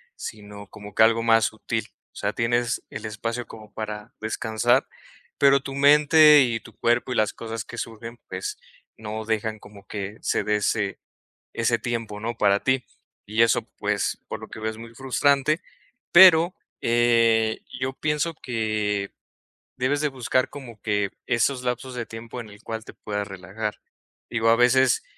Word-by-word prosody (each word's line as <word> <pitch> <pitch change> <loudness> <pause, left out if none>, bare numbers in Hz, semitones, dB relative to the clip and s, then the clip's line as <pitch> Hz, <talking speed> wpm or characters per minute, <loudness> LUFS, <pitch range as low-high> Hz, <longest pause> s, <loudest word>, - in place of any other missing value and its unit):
sino 105 -1 -8
como 105 0 -12
que - - +6
algo 115 +1 +4
más 115 -1 +4
sutil, 110 +1 -3 0.3
o - - -43
sea, - - -2
tienes 120 0 0
el - - -7
espacio 115 +3 -4
como 110 -1 -13
para 105 0 -6
descansar, 110 +3 +1 0.5
pero 140 0 +5
tu 135 0 -7
mente 150 +1 +7
y 115 -3 +1
tu 115 - -16
cuerpo 120 +2 +1
y - - -1
las 110 -2 +1
cosas 115 -1 -6
que 120 - -10
surgen, 115 +1 -7
pues, 420 0 -4 0.4
no 110 0 -6
dejan 110 0 -2
como 100 -1 -15
que 105 +1 -6
se - - 0
dé 105 - +1
ese 100 -1 -1 0.5
ese - - +1
tiempo, 115 -3 -4
¿no?, 115 +2 -3
para 100 -1 +3
ti, 130 -1 +1 0.4
y 110 +2 +1
eso, 115 -2 +4 0.2
pues, - - -1
por - - -5
lo - - -9
que - - -10
veo 110 - -2
es 110 - -7
muy 115 0 -11
frustrante, 140 +4 +2 0.5
pero, 175 -1 +8 0.3
eh, 115 -2 +3 0.2
yo 130 +1 -2
pienso 150 +3 -1
que 110 -5 -2 0.7
debes 130 +3 0
de 150 - +1
buscar 130 -1 0
como 120 -7 -11
que 105 -2 0 0.2
esos 125 +2 +1
lapsos 125 +1 -3
de 120 - -3
tiempo 115 +2 -8
en 110 -3 -9
el 105 0 -15
cual 110 0 -5
te - - -11
puedas 105 -1 -4
relajar, 95 +3 -5 0.5
digo, 115 -1 +1
a 115 - +7
veces, 125 +1 +4
115 Hz, 170 wpm, -24 LUFS, 110-130 Hz, 0.7 s, pero